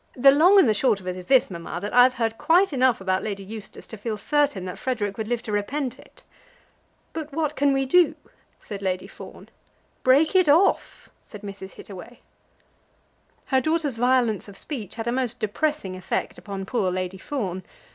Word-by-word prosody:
The 275 +2 +7
long 345 +8 +6
and 380 - +6
the 220 - +4
short 215 -1 +2
of 185 - -15
it 180 - -2
is 180 -1 -9
this, 260 -6 +4
mamma, 170 0 -6
that 205 +3 -5
I've 250 +1 +6
heard 225 -2 -2
quite 350 +2 +3
enough 255 -5 +2
about 190 0 0
Lady 200 -2 -4
Eustace 215 +1 -9
to 220 - -10
feel 215 +1 -4
certain 285 -4 0
that 180 - -7
Frederic 210 -6 -2
would 220 0 -4
live 240 0 -2
to 215 - -6
repent 250 +5 -2
it." - - -18 0.9
"But 310 -2 -6
what 305 0 -2
can 285 0 +2
we 270 0 +1
do?" 345 +4 +4 0.4
said 200 -1 -8
Lady 185 -1 -2
Fawn. - - -12 0.5
"Break 285 +7 +4
it 370 -5 +5
off," 340 +7 +2
said 210 - -12
Mrs. 195 -1 -8
Hittaway. 200 +5 -11 1.3
Her 265 -1 +2
daughter's 315 -3 -1
violence 245 -4 +1
of 200 -1 -11
speech 230 - -6
had 225 -1 -5
a 235 - 0
most 250 -2 -2
depressing 215 -2 -2
effect 185 - -3
upon 195 -2 -6
poor 200 -3 0
Lady 185 +1 -4
Fawn. 190 -8 -4
235 Hz, 185 wpm, -24 LUFS, 200-280 Hz, 1.3 s, The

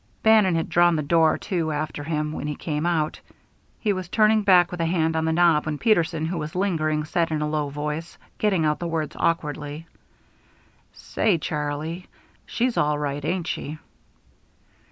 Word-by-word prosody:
Bannon 215 -5 +5
had 165 - -1
drawn 175 0 +4
the 155 - -1
door 160 +1 +3
to 165 -4 -2
after 150 0 -3
him 150 0 -2
when 150 - -5
he 150 - -3
came 155 +2 -2
out. 160 -3 0 0.6
He 210 -3 +1
was 185 -2 -5
turning 215 +1 +4
back, 180 -4 +5
with 175 -1 -4
a - - +1
hand 160 -2 +1
on 160 0 0
the 160 - +1
knob, 160 -2 +3
when 150 -1 -2
Peterson, 170 -6 +1
who 170 +1 -2
was 155 +2 -6
lingering, 155 -5 0
said 165 +1 0
in 155 -1 -1
a - - -1
low 150 -1 -1
voice, 150 +3 -5 0.2
getting 190 -7 +2
out 150 0 +1
the 175 - -3
words 160 -2 -3
awkwardly: 150 -1 -2 1.1
"Say, 205 -6 0
Charlie, 150 +3 -4 0.4
she's 245 0 -1
all 150 0 +2
right, 145 -1 -3
ain't 175 +2 -1
she." 155 -2 -4
160 Hz, 175 wpm, -24 LUFS, 150-175 Hz, 1.1 s, Bannon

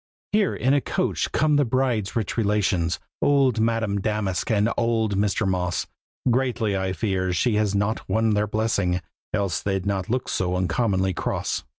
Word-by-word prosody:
Here 210 -1 +2
in 130 +2 +2
a 145 - +3
coach - - -1
come 150 -1 +3
the 145 - +4
bride's 120 -5 0
rich 110 -5 -1
relations, 100 -6 +1 0.2
Old 135 -5 +3
Madame 110 -3 0
Damask 105 -3 -1
and 105 -1 +3
old 115 -3 +1
Mr. 105 +1 +1
Moss; 90 -1 -1 0.5
Greatly 120 -5 0
I 95 -1 -1
fear 95 -2 -1
she 120 +5 +1
has 105 -2 +1
not 100 +3 -1
won 110 0 +2
their 105 0 +1
blessing, 100 -5 0 0.3
Else 100 -4 -1
they'd 95 -1 -1
not 100 0 -1
look 125 +2 -1
so 90 -1 -1
uncommonly 95 +1 +1
cross. - - -2
105 Hz, 165 wpm, -24 LUFS, 95-115 Hz, 0.5 s, the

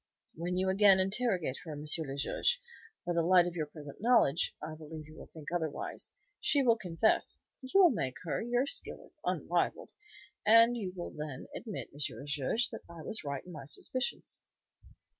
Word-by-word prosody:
"When 175 +3 -3
you 190 +1 +1
again 195 0 +6
interrogate 190 - +1
her, 160 -3 -6
M. 145 - -6
le 150 -3 -1
Juge, 480 - +1 0.5
by 175 - 0
the 170 - +2
light 175 +1 +6
of 175 -1 -4
your 155 -3 -2
present 145 0 -10
knowledge, 215 - +3
I 155 +1 -6
believe 155 0 -9
you 155 +1 -14
will - - -11
think 155 -1 -9
otherwise. 160 -4 -2 0.3
She 285 -2 +3
will 235 -3 +5
confess, 195 0 +2 0.2
you 260 - -9
will 360 -4 +8
make 130 - -2
her, 165 - -1
your 245 +3 +1
skill - - -1
is - - -22
unrivalled, - - 0 0.5
and 230 +2 +7
you 200 -6 -3
will 175 - -5
then 150 -3 -6
admit, 215 -5 -5
M. 145 - -12 0.2
le 140 - -8
Juge, 145 - 0
that - - -7
I 170 -2 -9
was 220 +1 -4
right 140 -2 -4
in 180 - -10
my 140 -5 -8
suspicions." 255 - -3
175 Hz, 185 wpm, -32 LUFS, 150-225 Hz, 0.5 s, will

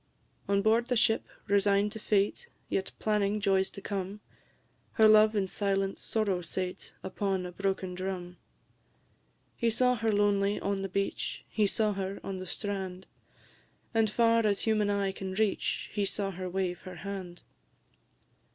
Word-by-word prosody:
On 200 0 +2
board 225 +2 +3
the 250 - +1
ship, 225 0 +2 0.2
resign'd 200 0 +3
to 220 - -7
fate, 210 - 0 0.2
Yet 190 - -1
planning 210 -1 +1
joys 195 -2 +2
to 200 - -10
come, 195 0 -4 0.7
Her 220 -2 +6
love 215 0 +6
in 195 -2 +1
silent 195 0 -1
sorrow 200 -5 0
sate 180 +2 -4
Upon 190 -1 -1
a 180 - -5
broken 190 0 -2
drum. 180 -1 -5 1.2
He 235 - +1
saw 250 +2 +3
her 225 -2 0
lonely 205 0 +2
on 200 -1 -1
the 195 - -3
beach; 195 +1 -2
He 215 -2 +2
saw 210 +1 +1
her 195 0 -4
on 190 -1 -4
the 185 - -7
strand; 190 -2 -4 0.9
And 225 -1 +3
far 230 +1 +3
as 205 -2 +2
human 215 -2 +2
eye 200 -1 +1
can 190 0 -5
reach 215 -1 0
He 205 - 0
saw 195 0 -1
her 185 0 -5
wave 180 -1 -1
her 185 -1 -9
hand! 185 -3 -6
200 Hz, 155 wpm, -30 LUFS, 190-215 Hz, 1.2 s, Her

